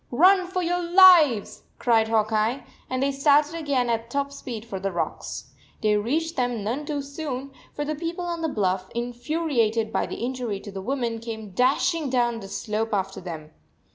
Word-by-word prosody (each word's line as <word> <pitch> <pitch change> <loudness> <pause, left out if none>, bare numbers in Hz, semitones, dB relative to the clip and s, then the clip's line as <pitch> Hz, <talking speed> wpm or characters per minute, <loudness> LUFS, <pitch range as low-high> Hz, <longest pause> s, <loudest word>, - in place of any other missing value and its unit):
"Run 365 +8 +5
for 365 0 -2
your 355 +1 0
lives," 340 - +6 0.2
cried 225 -2 +3
Hawk 220 -1 +1
Eye, 220 +5 0 0.3
and 255 +1 -1
they 280 - +2
started 290 +2 +3
again 285 -7 0
at 230 0 -1
top 280 +2 -1
speed 235 -5 -7
for 195 -5 -5
the 195 +1 -2
rocks. 170 - -4 0.3
They 210 -1 +3
reached 310 +11 -1
them 245 -4 -1
none 260 +8 -3
too 290 -2 -2
soon, 275 -2 -5 0.2
for 295 - -4
the 305 - -2
people 335 +3 -4
on 340 -1 -3
the 320 - 0
bluff, 190 -6 -1
infuriated 240 -3 -1
by - - 0
the - - -5
injury 245 -5 -3
to 205 - -9
the 195 0 -6
woman, 235 0 -2
came 220 -3 -7
dashing 275 - +1
down 240 -2 +1
the 195 - -9
slope 215 +2 -2
after 195 -1 -3
them. 160 -4 -8
245 Hz, 185 wpm, -25 LUFS, 220-300 Hz, 0.3 s, lives